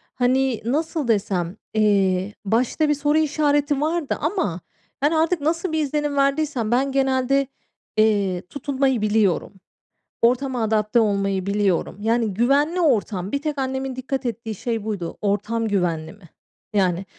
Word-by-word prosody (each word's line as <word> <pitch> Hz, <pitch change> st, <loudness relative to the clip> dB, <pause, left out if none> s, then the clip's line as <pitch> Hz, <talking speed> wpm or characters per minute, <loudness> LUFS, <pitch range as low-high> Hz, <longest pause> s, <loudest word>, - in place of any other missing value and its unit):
Hani, 255 Hz, -1 st, +1 dB
nasıl 300 Hz, +2 st, -1 dB
desem, 195 Hz, -5 st, 0 dB, 0.2 s
eee, 200 Hz, -2 st, +2 dB
başta 250 Hz, +8 st, +1 dB
bir -, -, +4 dB
soru 295 Hz, +1 st, +1 dB
işareti 290 Hz, -2 st, +1 dB
vardı 320 Hz, -1 st, -1 dB
ama 290 Hz, -, -1 dB, 0.4 s
ben 290 Hz, +2 st, +3 dB
artık 325 Hz, +1 st, +1 dB
nasıl 330 Hz, +3 st, -1 dB
bir 315 Hz, -, 0 dB
izlenim 295 Hz, 0 st, -1 dB
verdiysem; 275 Hz, -5 st, +1 dB
ben 270 Hz, +3 st, +2 dB
genelde, 270 Hz, 0 st, +1 dB, 0.5 s
eee, 200 Hz, -4 st, +2 dB
tutunmayı 270 Hz, -3 st, 0 dB
biliyorum. 210 Hz, -3 st, +1 dB, 0.7 s
Ortama 250 Hz, 0 st, +2 dB
adapte 215 Hz, +1 st, +2 dB
olmayı 200 Hz, -3 st, 0 dB
biliyorum. 200 Hz, -2 st, 0 dB
Yani, 225 Hz, -1 st, +1 dB
güvenli 285 Hz, -, +2 dB
ortam, 210 Hz, -, +1 dB
bir 280 Hz, -, -1 dB
tek 300 Hz, -1 st, -3 dB
annemin 265 Hz, 0 st, -2 dB
dikkat 260 Hz, +1 st, -4 dB
ettiği 230 Hz, -2 st, -4 dB
şey 230 Hz, 0 st, -3 dB
buydu. 200 Hz, -6 st, -4 dB
Ortam 210 Hz, +3 st, 0 dB
güvenli 175 Hz, -5 st, -1 dB
mi? 195 Hz, -5 st, -18 dB, 0.4 s
Yani, 190 Hz, -2 st, +1 dB
240 Hz, 135 wpm, -22 LUFS, 205-285 Hz, 0.7 s, bir